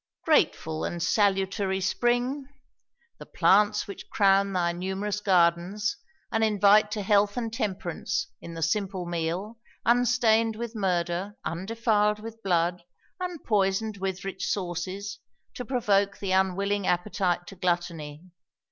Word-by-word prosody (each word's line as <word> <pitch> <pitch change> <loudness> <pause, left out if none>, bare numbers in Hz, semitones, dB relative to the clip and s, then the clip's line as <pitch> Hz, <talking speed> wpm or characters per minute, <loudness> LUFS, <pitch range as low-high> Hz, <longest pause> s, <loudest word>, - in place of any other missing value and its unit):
Grateful 160 - +2
and 175 - -3
salutary 195 -1 +1
Spring! 245 +7 0 0.7
the - - -9
plants 210 +1 +3
Which 200 - -9
crown 195 -1 +3
thy 175 -2 +1
numerous 190 +4 -3
gardens, 185 +2 +2 0.4
and 225 -1 +1
invite 210 0 +5
To 210 - -3
health 205 +1 +3
and 230 -2 -3
temperance, 195 -7 -2 0.2
in 170 - -8
the 165 - -3
simple 190 +1 -1
meal, 175 +6 -3 0.3
Unstain'd 235 -2 +3
with 235 +1 -5
murder, 185 -1 -1
undefil'd 210 +3 +1
with 225 +1 -9
blood, 175 -2 +1 0.4
Unpoison'd 215 - 0
with 190 0 -4
rich 190 -1 -4
sauces, 190 +1 -3 0.3
to 250 - -5
provoke 205 -5 +1
The 200 -2 -3
unwilling 190 +1 +1
appetite 175 -1 0
to 195 - -11
gluttony. 170 -4 -2
200 Hz, 120 wpm, -27 LUFS, 180-215 Hz, 0.7 s, invite